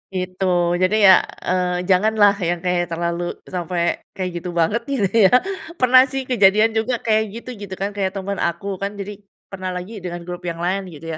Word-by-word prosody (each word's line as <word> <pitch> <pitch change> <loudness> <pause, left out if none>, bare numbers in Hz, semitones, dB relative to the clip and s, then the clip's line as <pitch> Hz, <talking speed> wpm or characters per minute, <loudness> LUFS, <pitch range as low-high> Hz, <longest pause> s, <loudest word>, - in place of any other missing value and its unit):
Gitu. 185 +1 -3 0.3
Jadi 185 +3 +2
ya, 190 -2 +8 0.2
eee, 180 -1 0
janganlah 205 +2 +4
yang 175 -1 -1
kayak 180 -1 0
terlalu 170 +1 -2 0.2
sampai 175 -1 -2 0.2
kayak 185 -2 -3
gitu 180 - -6
banget 190 +8 +1
gitu 260 -8 0
ya. 220 -4 +6 0.5
Pernah 255 0 +7
sih 270 0 -3
kejadian 220 -3 +4
juga, 225 +3 -1
kayak 220 -1 +2
gitu 235 +2 -8
gitu 195 -2 -7
kan, 195 +2 -3
kayak 200 -1 -2
temen 195 +1 -4
aku 180 +3 -2
kan. 200 +1 -4
Jadi 205 0 -7 0.3
pernah 185 -1 -5
lagi 195 +4 -6
dengan 175 -1 -5
grup 175 +1 -7
yang 170 0 -4
lain 190 +2 -1
gitu 165 +2 -7
190 Hz, 185 wpm, -20 LUFS, 180-210 Hz, 0.5 s, ya